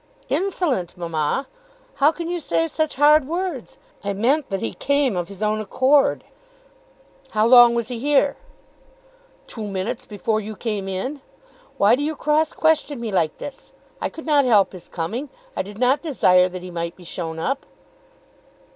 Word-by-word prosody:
"Insolent, 325 - -1
mamma! 165 - -1 0.5
How 290 +2 +5
can 335 0 -6
you 350 0 -2
say 330 +1 0
such 315 0 -2
hard 295 0 +5
words? 340 -6 -4 0.3
I 200 0 -1
meant 260 +9 +1
that 195 - -2
he 110 - -3
came 280 -5 +1
of 175 -1 -2
his 200 +1 -6
own 215 0 0
accord." 260 +7 +2 1.1
"How 215 0 +3
long 240 0 +8
was 235 0 -1
he 245 -2 -4
here?" 285 +1 +2 1.1
"Two 220 -3 -6
minutes 195 +3 -3
before 215 +1 -1
you 215 +1 -7
came 210 -4 -3
in. 255 +10 -4 0.6
Why 205 +4 +5
do 270 - -4
you 310 +2 -1
cross 305 +1 +1
question 310 -4 +1
me 230 -2 -4
like 170 -5 0
this? 280 -2 -9 0.3
I - - -1
could 320 - -10
not 295 -3 +4
help 215 -6 +4
his 180 -2 -11
coming. 220 - -4 0.3
I - - 0
did 200 +2 -9
not 255 +4 +2
desire 185 - +3
that 180 0 -8
he 180 - -8
might 170 0 -4
be 180 - -15
shown 165 -1 -5
up." 270 +12 -2
235 Hz, 170 wpm, -22 LUFS, 195-290 Hz, 1.1 s, long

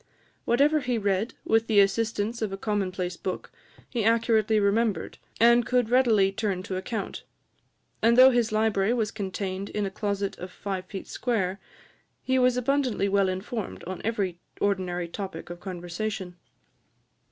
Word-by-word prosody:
Whatever 285 +6 +3
he 250 -3 -1
read, 205 +2 0
with 225 0 +2
the 215 -2 +4
assistance 215 +3 +1
of 215 -3 -1
a 195 - -4
commonplace 185 -4 -2
book, 185 - -5 0.4
he 235 -3 -2
accurately 225 -1 +3
remembered, 210 +1 0 0.2
and 235 +1 +6
could 245 0 +1
readily 225 -6 +4
turn 195 -2 -2
to 190 - -4
account; 195 +3 -4 0.8
and, 235 +1 +4
though 260 +1 +9
his 240 -3 +1
library 215 -1 +2
was 220 -3 0
contained 195 -1 -4
in 210 -1 -2
a 195 - -3
closet 200 -1 -2
of 180 - -6
five 190 -1 -4
feet 195 0 -7
square, 200 -6 -1 0.6
he 260 0 +2
was 250 -1 +3
abundantly 250 -5 +1
well 195 -1 +3
informed 190 +3 -4
on 185 +1 -6
every 200 -6 -1 0.2
ordinary 185 -3 0
topic 175 -2 -6
of 175 - -8
conversation. 180 +1 -5
205 Hz, 150 wpm, -27 LUFS, 190-230 Hz, 0.8 s, though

